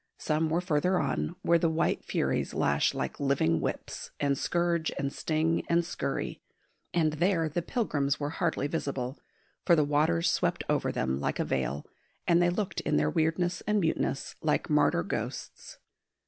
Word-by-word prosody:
Some 155 +1 0
were 165 +3 +1
further 180 +2 +1
on, 175 - -1
where 170 0 +4
the 165 - +2
white 160 0 0
furies - - -1
lash 70 0 +2
like - - -3
living 135 - +2
whips, - - -4
and 140 -1 +2
scourge 170 +2 0
and 140 0 -2
sting 160 +1 0
and 170 0 +3
scurry; - - -3 0.5
and 160 -3 +2
there 165 +1 +2
the 155 +3 -2
pilgrims 150 - 0
were 145 0 -2
hardly 145 - -1
visible, 140 -4 -3 0.4
for 170 - +5
the 155 - +4
waters 145 - +2
swept - - +1
over - - +1
them 65 +1 -1
like 70 - -1
a - - 0
veil, 70 +2 -2 0.4
and 170 0 +4
they 175 - +4
looked 185 +1 -2
in - - +1
their 75 +1 +2
weirdness 175 - 0
and 210 0 +3
muteness 165 -4 -1
like - - 0
martyr - - +3
ghosts. - - -5
160 Hz, 165 wpm, -29 LUFS, 140-170 Hz, 0.5 s, for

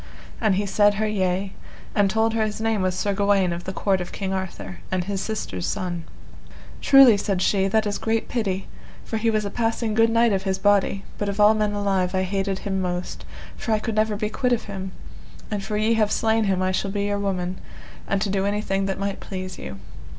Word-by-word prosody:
And 215 -4 +3
he 205 +2 0
said 205 +1 +3
her 215 +1 0
yea, 190 -1 -1 0.4
and 205 -2 +3
told 220 +2 +1
her 225 -1 +1
his 215 -1 -3
name 220 -2 0
was 185 -1 0
Sir 200 +2 0
Gawaine 195 -3 +2
of 170 +1 -6
the 190 - -3
court 190 0 0
of 180 - -6
King 190 -1 -3
Arthur, 100 - -5
and 185 -1 0
his 195 +1 -3
sister's 95 - -3
son. 175 -2 -3 0.8
Truly, 270 -6 +8
said 195 -2 -1
she, 195 +1 +2
that 215 +2 +2
is 205 -1 -2
great 225 0 0
pity, 195 -5 -2 0.4
for 225 - -2
he 225 +1 +1
was 215 -1 +1
a 200 - -3
passing 225 -1 -1
good 225 +1 +4
knight 230 -1 +3
of 190 - +1
his 190 -1 -1
body, 200 0 +2 0.2
but 205 - -1
of 200 +1 -4
all 210 +1 +7
men 210 -1 0
alive 195 -2 0
I 185 - +2
hated 195 0 -1
him 190 -1 -1
most, 180 -1 -4 0.3
for 225 - -2
I - - +3
could 225 +1 -3
never 215 0 +1
be 210 +1 -2
quit 250 +1 +1
of 235 - 0
him; 190 -2 -6 0.6
and 205 -2 -2
for 210 +1 -2
ye 215 +2 +2
have 215 -2 +2
slain 225 0 +2
him 190 -2 +1
I 185 - +1
shall 195 +1 -1
be 200 0 -1
your 205 0 -1
woman, 185 -2 -2 0.5
and 195 - +1
to 205 - -1
do 195 -1 0
anything 195 -1 -1
that 195 - -2
might 200 0 -3
please 185 -1 -6
you. 100 - -7
200 Hz, 225 wpm, -24 LUFS, 190-215 Hz, 0.8 s, Truly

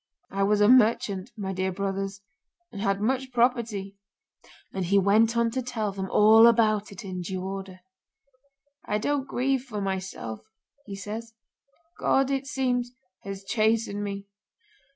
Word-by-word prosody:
I 195 - -2
was 205 +1 +3
a 205 - +6
merchant, 215 -5 +3
my 190 -2 -3
dear 190 0 -1
brothers, 195 +1 -3 0.5
and 200 - -7
had 195 -1 0
much 260 +3 -1
property. 230 -5 0 0.8
'And 190 -1 -2
he 200 +3 +3
went 215 +4 +4
on 235 0 +2
to 260 +2 -2
tell 225 -4 -3
them 190 -1 -5
all 220 +2 +7
about 215 -3 +3
it 200 0 -9
in 185 -1 -5
due 185 +1 -4
order. 190 -1 -6 1.1
'I 210 - +1
don't 280 +5 -1
grieve 265 +1 0
for 225 -6 -6
myself,' 190 - -4 0.5
he 200 - -6
says, 220 +3 -7 0.6
'God, 270 0 +2
it 270 0 -1
seems, 250 -3 -1 0.3
has 195 0 -7
chastened 215 0 0
me. 200 -1 -5
210 Hz, 150 wpm, -26 LUFS, 195-235 Hz, 1.1 s, all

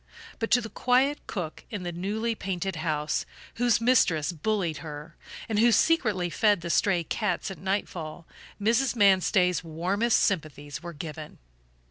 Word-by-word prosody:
But 225 - -2
to 245 - +4
the 225 - -6
quiet 260 +5 +2
cook 175 -6 -5
in 205 -4 -5
the 175 - -3
newly 210 +7 -2
painted 190 -3 -3
house, 155 -1 -1 0.3
whose 240 -2 +3
mistress 195 - +3
bullied 175 -1 -1
her, 150 0 -9 0.3
and 215 -2 0
who 235 +2 +5
secretly 215 - +2
fed 205 -2 +3
the 170 0 -3
stray 180 -3 +2
cats 200 +2 -2
at 185 - -9
nightfall, 175 -4 -3 0.3
Mrs. 235 +5 +2
Manstey's 185 -4 +3
warmest 185 +8 +1
sympathies 145 -6 -2
were 170 0 -7
given. 155 0 -8
190 Hz, 145 wpm, -27 LUFS, 165-220 Hz, 0.3 s, who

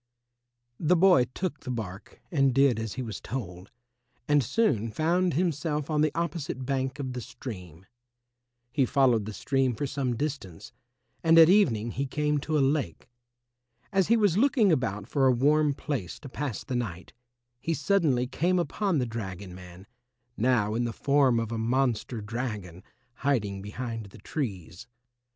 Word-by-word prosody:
The 170 +2 +3
boy 180 -7 +5
took 180 -6 -3
the - - -9
bark 100 -6 -6
and 135 -6 +2
did 135 -4 +4
as 110 -2 -4
he 130 - -4
was 110 -3 -6
told, 95 -7 -6 0.6
and 145 -2 +4
soon 120 - +1
found 170 - +1
himself 150 -3 -1
on 150 -1 +2
the 155 - +3
opposite 165 -6 -3
bank 130 0 -1
of 130 -3 -4
the 125 - -4
stream. 90 - -9 0.9
He 140 0 +2
followed 125 -4 +3
the 110 - -5
stream 130 +3 0
for 145 - -2
some 130 -3 -2
distance, 110 - -5 0.5
and 165 0 +5
at 165 0 +9
evening 120 - +3
he 135 +4 -2
came 150 +2 0
to 155 +2 -1
a 140 - +4
lake. 100 - -7 0.8
As 195 -2 +3
he 230 - +4
was 205 -4 +3
looking 245 -6 +4
about 105 -8 -1
for 135 0 +2
a - - +6
warm 145 +3 +3
place 130 - -4
to 145 - -8
pass 135 -4 -4
the 130 - -4
night, 100 -8 -4 0.5
he 165 +5 -1
suddenly 150 -6 +2
came 175 +8 0
upon 185 +1 0
the 125 - +1
dragon 100 -5 -6
man, 90 +1 -12 0.5
now 110 -3 +2
in 120 +2 0
the 120 -1 -2
form 135 -3 +3
of 115 -1 -3
a 115 - -2
monster 120 -1 0
dragon, 105 -6 -5 0.4
hiding 105 -9 0
behind 115 +1 -5
the 95 - -14
trees. 95 - -5
130 Hz, 165 wpm, -28 LUFS, 110-150 Hz, 0.9 s, at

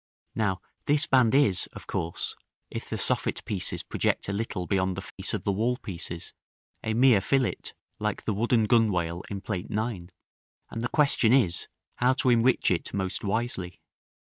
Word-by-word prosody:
Now 100 -4 0 0.2
this 145 0 +2
band 130 -2 +4
is, 110 -10 +3
of - - -10
course, 85 +1 -2 0.4
if - - -6
the - - -2
soffit - - +1
pieces - - -2
project - - -1
a 100 - -2
little 100 -3 -3
beyond 95 -1 0
the 95 - -4
face - - -3
of - - -4
the 100 - +1
wall 115 +5 0
pieces, 85 -5 -7 0.5
a 110 0 -1
mere 120 -4 +5
fillet, 130 +5 0 0.3
like 105 -1 -2
the 110 - -1
wooden 115 +2 +2
gunwale 90 -7 +2
in 100 -2 -4
Plate 100 -2 -4
IX.; 105 -5 -3 0.6
and 115 - -4
the 120 - 0
question 140 -6 +4
is, 95 -11 +2 0.3
how 125 +1 +3
to 130 -1 +2
enrich 120 +2 +3
it 90 - -1
most 95 0 -2
wisely. 100 -4 -2
105 Hz, 165 wpm, -27 LUFS, 95-120 Hz, 0.6 s, mere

